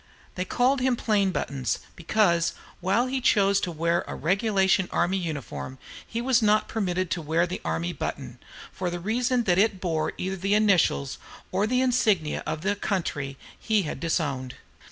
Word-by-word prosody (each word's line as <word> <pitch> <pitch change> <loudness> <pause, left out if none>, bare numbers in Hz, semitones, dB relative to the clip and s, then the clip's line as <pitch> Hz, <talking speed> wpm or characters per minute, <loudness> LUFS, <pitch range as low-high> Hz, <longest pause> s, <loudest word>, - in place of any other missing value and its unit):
They 185 - -3
called 255 +6 +2
him 255 -1 +2
"Plain 210 -4 +1
Buttons," 135 -8 -2 0.2
because, 170 -1 +2 0.3
while 195 +7 +2
he 260 +1 -2
always 260 - -4
chose 200 -1 +3
to 175 - -2
wear 170 +1 0
a - - -5
regulation 190 +1 +2
army 185 +3 +1
uniform, 145 -5 -5 0.3
he 230 - -3
was 250 -2 +3
not 215 0 +3
permitted 185 -4 -1
to 175 - -1
wear 160 +3 +1
the 180 +1 -5
army 80 +2 -2
button, - - -5 0.3
for 185 -1 -3
the 175 0 -4
reason 240 +6 +1
that 180 -3 +2
it 205 -2 +2
bore 165 -4 -1
either 190 +1 -3
the 195 +3 +1
initials 185 - +2 0.3
or 195 +3 +1
the 250 +2 +2
insignia 220 -11 +2
of 155 - -3
the 205 +3 0
country 145 -9 -2 0.2
he 215 -3 +1
had 155 - -5
disowned. 140 -6 -2
190 Hz, 175 wpm, -26 LUFS, 165-215 Hz, 0.3 s, chose